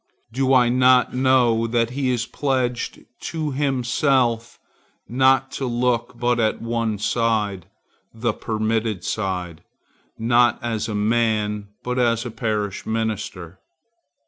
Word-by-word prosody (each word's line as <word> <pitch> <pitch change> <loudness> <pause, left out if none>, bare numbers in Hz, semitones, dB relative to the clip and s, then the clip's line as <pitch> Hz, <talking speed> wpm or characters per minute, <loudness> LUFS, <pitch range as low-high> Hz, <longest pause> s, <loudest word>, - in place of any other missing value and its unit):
Do 135 +1 +1
I 125 -2 +5
not 125 0 +4
know 125 -3 +3
that 115 0 0
he 135 0 -1
is 120 -1 0
pledged 130 -3 -2
to 155 -3 -3
himself 130 -3 0 0.5
not 130 +3 +3
to 135 - -3
look 120 0 -1
but 120 0 +1
at 110 -1 +1
one 115 -2 -2
side, 105 -4 0 0.4
the 115 0 -1
permitted 110 -3 -2
side, 90 -6 -3 0.6
not 120 +1 +3
as 115 -2 -2
a 105 - -3
man, 105 -1 0 0.2
but 125 +1 -2
as 115 -1 +1
a 120 - -5
parish 105 -3 -2
minister? 105 -5 -4
115 Hz, 120 wpm, -22 LUFS, 110-125 Hz, 0.6 s, I